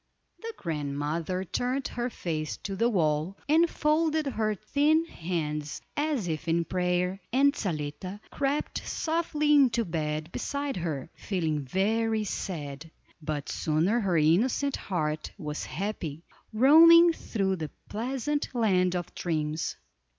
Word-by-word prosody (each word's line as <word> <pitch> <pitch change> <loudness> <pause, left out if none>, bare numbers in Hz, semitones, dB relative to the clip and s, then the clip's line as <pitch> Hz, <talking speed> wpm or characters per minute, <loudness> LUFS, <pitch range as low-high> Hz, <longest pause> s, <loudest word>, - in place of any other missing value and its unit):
The 455 0 -6
grandmother 155 +3 -2
turned 250 - -2
her 240 +1 -2
face 155 -8 -3
to 195 - -3
the 230 +5 +2
wall, 160 -2 0
and 325 +3 +4
folded 310 0 +1
her 220 -5 0
thin 295 - +2
hands 155 - -3 0.2
as 290 - 0
if 160 0 -3
in 165 +1 +2
prayer, 180 +1 0
and 280 +3 +4
Zaletta 180 - -4
crept 280 +1 -1
softly 315 -2 0
into 255 -5 +4
bed 155 -1 -3
beside 280 0 -3
her, 160 -4 -3
feeling 160 -6 -2
very 220 - +1
sad; 155 -6 -5 0.3
but 150 -2 -3
soon 155 +1 0
her 200 -4 +2
innocent 225 - +3
heart 155 -5 -2
was 150 -5 -4
happy, 170 -5 -4 0.3
roaming 330 +8 +8
through 195 -10 -1
the 155 -2 -4 0.2
pleasant 265 +6 -2
land 185 -6 +2
of 175 -1 -4
dreams. 155 -2 -2
190 Hz, 125 wpm, -28 LUFS, 160-265 Hz, 0.3 s, roaming